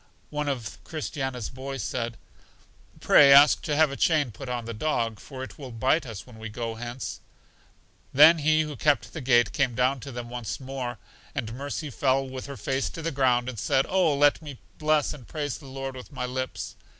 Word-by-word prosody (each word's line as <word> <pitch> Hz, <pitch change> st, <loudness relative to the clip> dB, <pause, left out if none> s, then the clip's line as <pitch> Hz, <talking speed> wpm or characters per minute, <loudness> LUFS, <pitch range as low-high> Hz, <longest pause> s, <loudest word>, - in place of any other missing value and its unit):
One 150 Hz, -1 st, -1 dB
of 120 Hz, -7 st, -5 dB
Christiana's 135 Hz, -7 st, -4 dB
boys 135 Hz, +1 st, -5 dB
said: 115 Hz, -2 st, -3 dB, 0.8 s
Pray 140 Hz, -1 st, +7 dB
ask 140 Hz, +2 st, +8 dB
to 150 Hz, -, -1 dB
have 155 Hz, -1 st, +4 dB
a -, -, -4 dB
chain 150 Hz, -5 st, +2 dB
put 135 Hz, +4 st, -8 dB
on 120 Hz, -2 st, -3 dB
the 115 Hz, -, -5 dB
dog, 115 Hz, -3 st, -1 dB
for 130 Hz, +2 st, -8 dB
it 130 Hz, -, -10 dB
will 135 Hz, -3 st, -7 dB
bite 130 Hz, +6 st, +1 dB
us 110 Hz, -2 st, -7 dB
when 120 Hz, -3 st, -14 dB
we 110 Hz, 0 st, -6 dB
go 115 Hz, +1 st, -4 dB
hence. 120 Hz, +3 st, -6 dB, 0.9 s
Then 155 Hz, +4 st, +8 dB
He 155 Hz, +1 st, +3 dB
who 150 Hz, -1 st, -4 dB
kept 145 Hz, +2 st, +1 dB
the 160 Hz, -, -5 dB
gate 120 Hz, -2 st, +3 dB
came 130 Hz, -4 st, +1 dB
down 130 Hz, +2 st, +2 dB
to 140 Hz, +3 st, -8 dB
them 120 Hz, -1 st, -6 dB
once 120 Hz, -3 st, -5 dB
more, 130 Hz, -3 st, -5 dB, 0.4 s
and 115 Hz, -6 st, -3 dB
Mercy 140 Hz, +3 st, -5 dB
fell 135 Hz, +1 st, +1 dB
with 130 Hz, 0 st, -7 dB
her 140 Hz, -1 st, -7 dB
face 135 Hz, 0 st, -1 dB
to 165 Hz, -, -8 dB
the 165 Hz, -, -1 dB
ground, 125 Hz, -3 st, +2 dB
and 125 Hz, -4 st, -5 dB
said, 135 Hz, +5 st, +2 dB
Oh, 180 Hz, -6 st, +2 dB
let 145 Hz, +2 st, +4 dB
me 145 Hz, -4 st, -8 dB, 0.2 s
bless 155 Hz, -1 st, +2 dB
and 130 Hz, -6 st, -12 dB
praise 145 Hz, -3 st, -3 dB
the 140 Hz, -, -13 dB
Lord 135 Hz, 0 st, -5 dB
with 125 Hz, +2 st, -10 dB
my 130 Hz, -3 st, -3 dB
lips! 130 Hz, +1 st, -4 dB
135 Hz, 205 wpm, -26 LUFS, 120-145 Hz, 0.9 s, ask